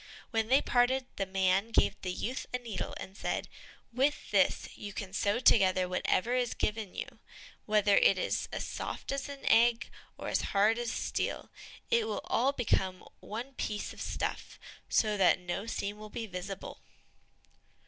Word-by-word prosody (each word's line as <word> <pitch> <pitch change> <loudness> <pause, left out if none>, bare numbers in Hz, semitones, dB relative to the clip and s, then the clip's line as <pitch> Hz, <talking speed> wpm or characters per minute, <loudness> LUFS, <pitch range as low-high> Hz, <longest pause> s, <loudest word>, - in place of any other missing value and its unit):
When 225 -2 +1
they 265 +4 +4
parted, 255 +1 +2
the 195 - -1
man 190 +2 +2
gave 230 - +3
the 180 - -2
youth 245 +8 -3
a 250 - 0
needle, 230 -5 -5
and 190 - -8
said, - - -2 0.5
"With 275 +4 0
this - - +3
you 205 -1 -8
can 190 -2 -6
sew 205 +2 +1
together 185 -6 +4
whatever 185 +5 +1
is 250 -2 0
given 210 -2 -2
you, - - -6 0.5
whether 210 -1 +4
it 195 - +5
is - - -1
as - - -3
soft - - -5
as 275 +1 -3
an 280 -1 -8
egg 235 0 +4 0.3
or - - -6
as - - +1 0.2
hard 215 +4 +4
as 240 -1 -2
steel; - - -2 0.4
and 470 - +5
it 445 - -2
will - - -2
all 255 +4 +2
become 190 -8 0
one 240 +6 -6
piece 210 -4 -3
of - - -10
stuff, - - -3 0.3
so 215 -2 +2
that 190 -2 +5
no 180 +4 -4
seam 205 -2 -3
will 215 0 -9
be 225 +2 -4
visible." 190 0 -6
215 Hz, 170 wpm, -31 LUFS, 195-245 Hz, 0.5 s, it